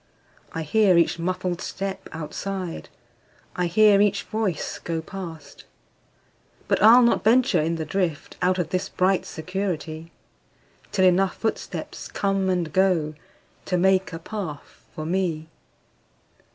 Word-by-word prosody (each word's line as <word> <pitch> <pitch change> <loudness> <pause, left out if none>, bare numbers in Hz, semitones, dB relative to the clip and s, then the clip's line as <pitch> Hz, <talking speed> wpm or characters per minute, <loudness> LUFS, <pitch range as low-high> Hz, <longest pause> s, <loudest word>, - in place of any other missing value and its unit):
I 160 - -4
hear 190 +3 +4
each 170 0 +2
muffled 180 +1 -2
step 195 0 -5
outside,I 165 - -6
hear 205 +3 +5
each 205 -1 +2
voice 215 -7 -2
go 165 -1 -3
past. 165 -3 -9 1.0
But - - +1
I'll 230 +4 +8
not 235 - +3
venture 230 -6 +4
in 165 +2 0
the 160 -1 -4
driftOut 180 +1 -1
of 170 -3 -1
this 185 +2 -2
bright 185 +1 +1
security, 165 -2 -4 0.8
Till 190 -2 +3
enough 185 +1 +3
footsteps 225 - -4
come 195 -1 0
and 175 -4 -1
goTo 180 -5 +2 0.6
make 190 +1 +3
a 165 - -5
path 165 -4 -7
for 155 - -5
me. 165 -3 -1
185 Hz, 120 wpm, -24 LUFS, 165-195 Hz, 1.0 s, I'll